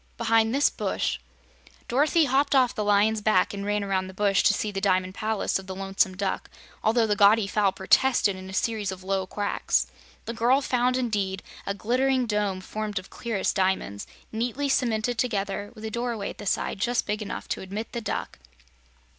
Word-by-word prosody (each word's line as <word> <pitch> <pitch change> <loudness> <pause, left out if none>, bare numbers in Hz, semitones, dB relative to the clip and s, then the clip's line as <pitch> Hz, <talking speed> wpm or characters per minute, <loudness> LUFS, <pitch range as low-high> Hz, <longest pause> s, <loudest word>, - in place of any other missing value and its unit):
"Behind 225 -1 +3
this 280 +3 +3
bush." - - -2 0.7
Dorothy 300 +6 +3
hopped 275 +2 +2
off 255 -2 +4
the 210 - -2
lion's 210 +1 +3
back 205 -3 +2
and 200 0 -5
ran 205 0 0
around 190 -1 -1
the 190 - -11
bush 200 -1 +3
to - - +4
see 210 - -2
the 195 -1 -4
Diamond 185 -2 +1
Palace 215 -1 -1
of 190 - -11
the 190 - -5
Lonesome 195 -1 0
Duck, 195 -1 -2 0.3
although 225 +1 +3
the 210 -1 +1
gaudy 205 +1 +5
fowl 200 0 +2
protested 200 +2 +3
in 190 0 -9
a - - -7
series 210 -1 -1
of 185 -1 -8
low 190 0 -1
quacks. 205 +1 0 0.4
The 230 - -4
girl 240 +4 +3
found, 250 -1 +1
indeed, 205 -6 -1 0.2
a 200 - -1
glistening 255 +5 +1
dome 210 -4 -1
formed 210 +1 -4
of 185 - -5
clearest 225 -5 -2
diamonds, 185 - -1 0.2
neatly 245 +5 -2
cemented 240 -2 0
together, 205 -4 -1
with 220 0 -9
a 220 - -4
doorway 235 -3 -2
at - - -15
the 205 - -6
side 195 - -1
just 240 +5 0
big 210 +1 -2
enough 210 - -5
to - - -2
admit 200 +4 -5
the 235 - -4
duck. 210 - -4
210 Hz, 190 wpm, -26 LUFS, 195-235 Hz, 0.7 s, gaudy